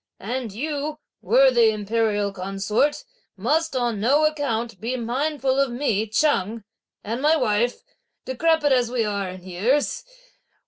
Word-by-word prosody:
And 240 +2 -4
you, 295 +6 -3 0.2
worthy 240 +2 +5
imperial 210 -1 0
consort, 195 - -1 0.3
must, 320 -1 0
on 240 -4 0
no 280 +8 +3
account, 240 -9 -2
be 245 +3 -2
mindful 265 +3 -1
of 275 -1 +2
me 230 -4 0
Cheng 220 -3 0 0.4
and 230 +4 -3
my 305 +2 +4
wife, 240 -3 0 0.4
decrepid 300 +2 +1
as 245 -2 +2
we 240 -2 0
are 200 -2 -2
in 185 0 -9
years. 205 +11 0
240 Hz, 130 wpm, -23 LUFS, 210-285 Hz, 0.4 s, worthy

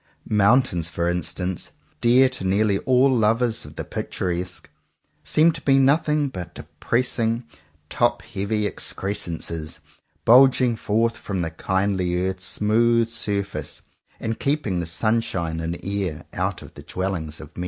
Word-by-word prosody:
Mountains, 105 -5 +3
for 85 0 -2
instance, 90 +1 -2 0.3
dear 125 +3 +5
to 130 -6 -5
nearly 100 +1 +2
all 130 +1 +5
lovers 115 +1 +1
of - - -12
the - - -4
picturesque, 90 0 -4 0.6
seem 160 +2 +4
to 155 -2 -8
be 135 -1 +3
nothing 150 +2 +3
but 90 - -7
de - - -7 0.2
pressing 115 -1 0 0.4
top 120 +8 +1
heavy 105 0 -2
excrescences, 85 -6 -2 0.5
bulging 125 0 +6
forth 115 +1 0
from 95 -3 -4
the 80 - -3
kindly 95 +1 0
earth's 95 0 -2
smooth 115 +3 +2
sur 105 -3 -1
face, 100 - -7 0.4
and 115 0 -3
keeping 140 -11 0
the 85 - -3
sunshine 85 -4 0
and 85 +1 -3
air 95 -5 -3
out - - -2
of - - -13
the - - -11
dwellings 85 -5 -4
of 75 - -12
men. - - -8
105 Hz, 145 wpm, -23 LUFS, 90-120 Hz, 0.6 s, bulging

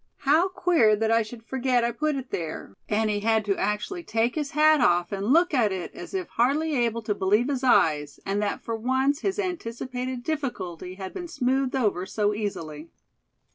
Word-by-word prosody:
How 310 +6 +4
queer 335 -13 +3
that 220 +1 0
I 230 0 +4
should 225 +1 -8
forget 250 0 0
I 235 - +1
put 300 +5 -1
it 265 -2 -6
there," 160 - -5 0.2
and 220 +1 +1
he 205 - -1
had 220 0 +1
to 200 -1 +1
actually 210 - -2
take 230 -5 0
his 300 -3 -2
hat 310 -1 +5
off, 175 -6 +3
and 200 0 -3
look 335 +3 +4
at 230 -7 +3
it, 185 -2 -5
as 360 +1 -8
if 370 -2 -2
hardly 290 +7 +1
able 235 -3 0
to 210 - 0
believe 210 +6 +1
his 270 -2 -2
eyes, 150 - +2
and 200 +1 -1
that 205 - -2
for 230 - -3
once 260 +5 +1
his 385 +3 -2
anticipated 255 - -4
difficulty 185 - -4
had 190 -1 -7
been 350 -2 -6
smoothed 265 -4 0
over 205 -7 0
so 210 +1 0
easily. 165 -7 -5
235 Hz, 195 wpm, -26 LUFS, 205-285 Hz, 0.2 s, hat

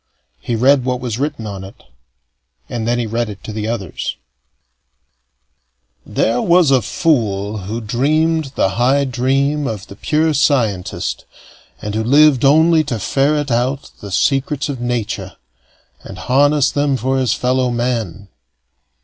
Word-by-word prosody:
He 120 - -3
read 130 +3 +4
what 125 0 -1
was 125 -2 -4
written 140 -5 -3
on 100 -2 -6
it, 95 - -13 0.8
and 115 -2 -4
then 120 +1 +1
he 120 - -1
read 115 +1 -2
it 100 -2 -10
to 110 - -7
the 105 0 -3
others: 110 -7 -4 1.9
There 115 - 0
was 170 -4 +4
a 130 -2 +4
fool 105 -10 0
who 115 +2 -3
dreamed 150 +6 0
the - - +2
high 135 +4 +3
dream 135 +3 0
of 105 -3 -5
the 100 - -12
pure 155 +8 +1
scientist, 120 - 0 0.6
and 105 - -4
who 110 +1 -1
lived 140 +2 +5
only 160 +3 +5
to 125 -5 -2
ferret 140 +6 0
out 130 +4 -1
the 100 - -7
secrets 140 +7 0
of 135 -4 -4
nature, 120 -3 -3 0.7
and 95 - -10
harness 140 +7 +2
them 145 -2 +1
for 130 +1 0
his 130 -4 +1
fellow 125 0 +1
men. 115 -6 -2
125 Hz, 145 wpm, -17 LUFS, 110-140 Hz, 1.9 s, lived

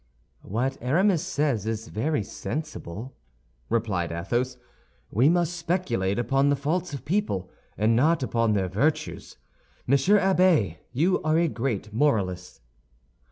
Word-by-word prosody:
"What 125 +7 -2
Aramis 170 - +2
says 135 -8 -1
is 110 0 -3
very 125 +2 -1
sensible," 130 - -6 0.5
replied 100 -7 0
Athos; 120 +10 -2 0.5
"we 125 +8 +4
must 175 0 +1
speculate 160 - -1
upon 135 +4 +2
the 145 - +3
faults 160 +6 -2
of 140 - -7
people, 150 - -1 0.3
and 110 +2 +3
not 150 +4 +3
upon 115 -3 +1
their 95 -2 +1
virtues. 135 - -1 0.5
Monsieur 140 +11 +4
Abbé, 185 - +3
you 165 +9 +1
are 155 0 +2
a 170 0 +3
great 115 -7 -3
moralist." 95 - 0
130 Hz, 125 wpm, -26 LUFS, 110-160 Hz, 0.5 s, we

